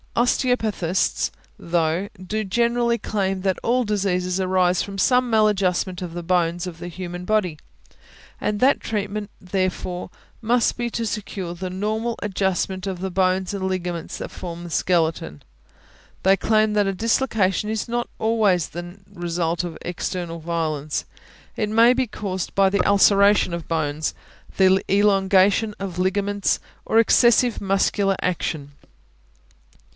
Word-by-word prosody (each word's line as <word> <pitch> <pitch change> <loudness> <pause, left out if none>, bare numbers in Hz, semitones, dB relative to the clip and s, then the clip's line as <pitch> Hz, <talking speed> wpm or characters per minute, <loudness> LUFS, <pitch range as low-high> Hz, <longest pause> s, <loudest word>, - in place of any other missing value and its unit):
Osteopathists, 225 -7 +1 0.3
though, 170 +3 0
do 215 +4 -2
generally 235 +3 +1
claim 195 -3 -2
that 190 -1 0
all 250 +2 +2
diseases 190 -3 0
arise 185 -1 +2
from 200 -1 -6
some 250 +5 +3
maladjustment 195 -4 +1
of 175 -2 -5
the 175 - -4
bones 175 0 0
of 170 -2 -8
the 175 - -6
human 175 0 -6
body, 185 -6 0 0.8
and 210 0 -1
that 265 +4 +4
treatment, 210 -1 -3
therefore, 185 -1 -3 0.3
must 235 +1 +2
be 240 0 -2
to 230 0 -3
secure 200 -5 -4
the 180 +1 -5
normal 220 +5 -2
adjustment 190 -1 -1
of 185 -2 -4
the 190 +1 -3
bones 185 +1 +1
and 190 -1 -2
ligaments 175 -3 -3
that - - -6
form 175 -1 -7
the 175 - -7
skeleton. 165 - 0 0.8
They 190 +1 +5
claim 215 +1 +2
that 205 -1 +2
a 195 - 0
dislocation 215 -2 +1
is 220 +1 -2
not 240 0 -2
always 215 -7 +2
necessarily 175 +2 -7
the 185 - -15
result 170 0 -1
of 175 -2 -6
external 175 -1 -4
violence; 155 -3 -2 0.5
it 210 -2 -1
may 230 +3 +6
be 255 0 0
caused 190 -4 -4
by 195 -1 +4
the 200 +1 +1
ulceration 200 -2 +4
of 170 -1 -5
bones, 155 -2 -1 0.4
the 190 0 +4
elongation 200 +1 +3
of 185 -3 -5
ligaments, 200 +2 0 0.3
or 225 - +1
excessive 235 +1 +4
muscular 195 0 +1
action. 155 -5 -2
190 Hz, 140 wpm, -22 LUFS, 180-210 Hz, 0.8 s, may